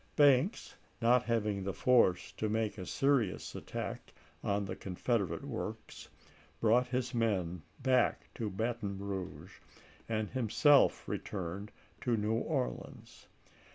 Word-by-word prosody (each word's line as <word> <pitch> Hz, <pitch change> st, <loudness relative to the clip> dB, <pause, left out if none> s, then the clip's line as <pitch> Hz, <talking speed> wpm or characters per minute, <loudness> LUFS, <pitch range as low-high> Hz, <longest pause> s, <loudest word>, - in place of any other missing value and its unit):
Banks, 145 Hz, -, +4 dB, 0.2 s
not 120 Hz, +1 st, +4 dB
having 105 Hz, -4 st, 0 dB
the 95 Hz, -1 st, -3 dB
force 95 Hz, -8 st, +3 dB
to 110 Hz, -, -3 dB
make 110 Hz, -1 st, -1 dB
a 90 Hz, -, -6 dB
serious 135 Hz, -8 st, +1 dB
attack -, -, -6 dB, 0.3 s
on 100 Hz, 0 st, 0 dB
the -, -, -4 dB
Confederate 95 Hz, -2 st, -2 dB
works, -, -, -6 dB, 0.5 s
brought 120 Hz, +3 st, +4 dB
his 125 Hz, 0 st, -2 dB
men 95 Hz, -8 st, 0 dB, 0.2 s
back 130 Hz, -2 st, +2 dB
to 110 Hz, -3 st, -3 dB
Baton 105 Hz, 0 st, -2 dB
Eouge, 95 Hz, -2 st, -6 dB, 0.5 s
and 110 Hz, -1 st, 0 dB
himself 130 Hz, +3 st, +4 dB
returned 95 Hz, +2 st, -4 dB, 0.3 s
to 120 Hz, -2 st, +1 dB
New 105 Hz, +1 st, 0 dB
Orleans. 130 Hz, +3 st, -3 dB
110 Hz, 120 wpm, -33 LUFS, 100-125 Hz, 0.5 s, Banks